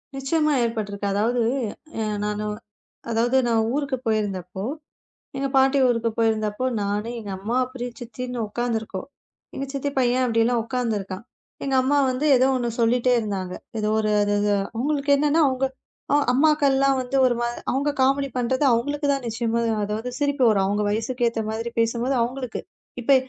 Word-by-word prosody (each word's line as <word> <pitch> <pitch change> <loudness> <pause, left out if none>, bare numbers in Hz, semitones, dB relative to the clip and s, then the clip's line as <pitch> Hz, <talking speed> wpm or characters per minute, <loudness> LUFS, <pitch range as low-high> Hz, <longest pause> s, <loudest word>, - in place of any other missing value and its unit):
நிச்சயமாக 285 0 +1
ஏற்பட்டிருக்கு. 210 -3 -2
அதாவது 230 +4 +1 0.6
அ - - 0 0.2
நானு 210 0 -2 1.0
நான் 225 -1 +2
ஊருக்குப் 275 -4 -2
போயிருந்தப்போது, 200 - -2 0.6
எங்க 275 - 0
பாட்டி 265 +1 +4
ஊருக்குப் 230 -2 0
போயிருந்தப்போது 220 +2 +1
நானு 205 +3 -2
எங்க 205 -3 -7
அம்மா 220 +5 -2
அப்படி, 255 -1 -6
சித்தி 240 +1 -8
என்று 250 -1 -4
உட்கார்ந்திருக்கோம். 225 -1 -3 0.5
எங்க 275 - -3
சித்தி 280 +1 -1
பையன் 250 +1 +2
அப்படி 230 -2 +2
எல்லாம் 240 0 +2
உட்கார்ந்து 240 -2 -1
இருக்கான். 190 +2 -7 0.4
எங்க 270 -1 0
அம்மா 285 +3 +2
வந்து 255 +4 -1
ஏதோ 255 +1 +4
ஒன்று 240 -2 -1
சொல்லிக்கொண்டே 245 +2 +3
இருந்தாங்க. 195 -4 -3 0.2
ஏதோ 210 - 0
ஒரு 215 -1 +1
அது 205 0 +1 0.4
அவங்களுக்கு 285 +3 0
என்னன்னா, 300 +3 +3
அவங்க 260 +1 0 0.5
அ - - +6 0.2
அம்மாக்கள் 290 0 +4
எல்லாம் 275 0 +3
வந்து 255 +2 -2
ஒரு 250 - +3
மா 240 - +1 0.2
அவங்க 280 +3 0
காமெடி 275 +1 +2
பண்றது 255 +3 0
அவங்களுக்கு 285 +5 0
தான் 275 -3 -3
நிச்சயமாக, 230 0 -1 0.2
அதாவது 215 +4 -3
சிரிப்பு 285 -2 +1
வரும். 195 -3 +3
அவங்க 205 +1 0
வயசுக்கு 235 +3 0
ஏத்த 225 - -3
மாதிரி 225 +2 -3
பேசும்போது 235 +3 +1
அவங்களுக்கு. 250 0 -3 0.4
இப்போ 270 +4 +5
240 Hz, 155 wpm, -24 LUFS, 220-270 Hz, 1.0 s, அ